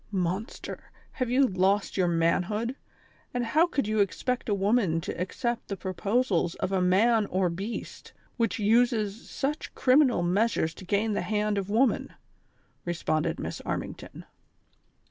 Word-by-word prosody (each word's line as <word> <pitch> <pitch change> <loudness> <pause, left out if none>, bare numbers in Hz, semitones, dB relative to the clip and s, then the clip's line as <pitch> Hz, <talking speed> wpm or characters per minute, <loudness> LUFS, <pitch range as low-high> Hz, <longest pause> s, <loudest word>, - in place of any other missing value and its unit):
''Monster, 190 +3 -3 0.3
have 255 -3 -2
you 265 +3 +4
lost 195 -1 +1
your 185 -2 +2
manhood, 180 +8 0 0.6
and 245 -1 0
how 310 +9 +3
could 275 -10 -1
you 215 0 0
expect 235 +5 0
a - - +3
woman 195 -4 +2
to - - -5
accept 235 +6 -2
the 200 - -4
proposals 190 -1 0
of - - -3
a 190 -1 +1
man 210 +4 +3
or 185 -2 0
beast, 195 +7 -6 0.2
which 230 -5 0
uses 225 -1 +1
such 290 +2 -3
criminal 255 - +4
measures 180 -2 +1
to 185 - -11
gain 205 +3 +1
the - - 0
hand 210 0 0
of 195 0 -5
woman 230 +4 +2
V" - - -22 0.7
responded 165 -1 -1
Miss - - -5
Armington. - - -5
210 Hz, 145 wpm, -28 LUFS, 185-235 Hz, 0.7 s, you